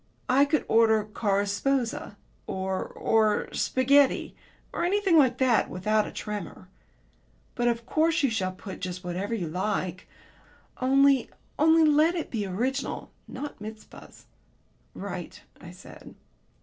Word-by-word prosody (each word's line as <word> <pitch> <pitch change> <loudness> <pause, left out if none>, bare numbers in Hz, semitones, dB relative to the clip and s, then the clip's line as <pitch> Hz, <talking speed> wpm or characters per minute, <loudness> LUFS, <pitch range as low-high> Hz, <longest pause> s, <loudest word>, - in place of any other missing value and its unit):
I 270 +3 +5
could 295 +1 0
order 220 -1 +4
'Cars 205 -1 -1
sposa,' 240 -1 -1 0.3
or 190 0 -3
or 215 -2 0
'Spaghetti,' 270 +2 +2 0.4
or - - -2
anything 385 0 +2
like 260 -5 +4
that, 255 -3 +2
without 210 +3 0
a - - -7
tremor." 205 -3 -7 0.8
"But 240 -1 0
of 235 -1 -1
course 315 +3 +1
you 270 - +2
shall 190 -4 -1
put 190 +1 -9
just 180 0 -5
whatever 185 +5 -3
you 180 -7 -3
like. 185 +1 -3 0.7
Only 275 0 +4 0.3
only 320 +2 +5
let 305 +3 +4
it 335 - -4
be 210 -4 -2
original. 250 +9 -3 0.2
Not 285 +3 -7
Mizpahs." 215 0 -11 0.7
"Right," - - -7 0.2
I - - -10
said. - - -13
230 Hz, 130 wpm, -27 LUFS, 200-275 Hz, 0.8 s, I